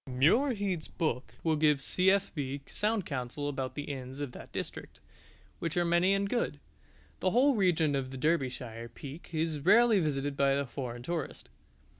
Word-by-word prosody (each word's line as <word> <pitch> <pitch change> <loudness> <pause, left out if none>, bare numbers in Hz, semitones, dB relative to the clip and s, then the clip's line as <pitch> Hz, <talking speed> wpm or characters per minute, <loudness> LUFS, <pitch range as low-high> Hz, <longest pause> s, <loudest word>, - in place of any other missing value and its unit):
Muirhead's 185 - +2
book 145 -7 -2
will 160 -1 +2
give 150 -2 +3
C.F.B. 160 -6 +1
sound 210 -2 -1
counsel 135 +1 -3
about 135 -2 -3
the 145 - -3
inns 135 -2 -6
of 145 -3 -3
that - - -11
district, - - -6 0.6
which 165 0 -3
are 175 - +3
many 175 +3 +3
and 200 0 0
good. 235 +3 -1 0.6
The 185 - +2
whole 260 +8 +4
region 175 - +2
of 135 -2 -1
the 130 - -7
Derbyshire 125 -6 -1
Peak 145 +4 -9
is 160 -2 -1
rarely 215 +7 +5
visited 145 -3 -1
by 140 0 +3
the 140 0 0
foreign 120 -2 -6
tourist. 170 - -4
150 Hz, 160 wpm, -31 LUFS, 135-185 Hz, 0.6 s, rarely